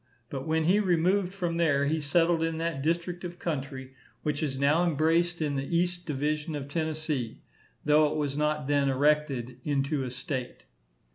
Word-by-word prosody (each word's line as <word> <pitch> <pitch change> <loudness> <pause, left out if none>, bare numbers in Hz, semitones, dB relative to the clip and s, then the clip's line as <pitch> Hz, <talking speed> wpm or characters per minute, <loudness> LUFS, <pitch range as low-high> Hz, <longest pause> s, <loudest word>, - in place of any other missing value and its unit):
But 135 +1 -4
when 160 0 +2
he 185 +6 +4
removed 185 0 +2
from 175 -4 -2
there, 145 -4 +3
he 155 +3 +1
settled 165 +3 +2
in 165 0 0
that 165 -4 -2
district 170 +3 -1
of 175 -1 -6
country 135 -5 -4 0.3
which 150 -1 -1
is 140 -4 -1
now 145 +5 +3
embraced 170 +1 +2
in 145 -2 -1
the 140 +5 -1
east 175 0 -1
division 150 +2 -1
of 140 -2 -5
Tennessee, 155 -5 -3 0.4
though 150 0 +5
it - - -3
was 145 -2 -1
not 150 -1 0
then 140 -1 +2
erected 135 -3 +1
into 140 0 0
a 130 - -3
state. 125 +1 -5
150 Hz, 170 wpm, -28 LUFS, 140-170 Hz, 0.4 s, though